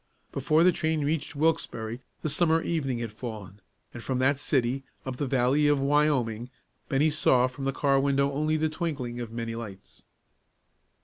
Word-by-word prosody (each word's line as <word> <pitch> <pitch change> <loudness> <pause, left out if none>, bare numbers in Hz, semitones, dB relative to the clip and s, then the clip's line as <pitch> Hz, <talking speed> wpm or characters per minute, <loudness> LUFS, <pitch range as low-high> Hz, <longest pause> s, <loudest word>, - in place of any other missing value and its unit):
Before 155 +4 +2
the 180 - +6
train 160 -3 0
reached 150 -1 -2
Wilkesbarre 120 -7 -1 0.2
the 155 - 0
summer 165 +1 +2
evening 135 -7 -1
had 115 -2 -4
fallen, 105 -3 -8 0.3
and 120 - -7
from 130 +2 -2
that 130 +2 +2
city, 135 -2 0 0.2
up 130 -1 -4
the 140 - -1
valley 135 +3 +3
of 145 -1 +3
Wyoming, 135 -5 +1 0.4
Bennie 150 +3 +3
saw 130 -4 +4
from 130 +2 -5
the 135 - +1
car 135 0 +2
window 140 0 +2
only 155 +2 0
the 155 0 +1
twinkling 150 -7 -3
of 120 -2 -5
many 115 0 -4
lights. 105 -5 -9
135 Hz, 170 wpm, -27 LUFS, 120-150 Hz, 0.4 s, the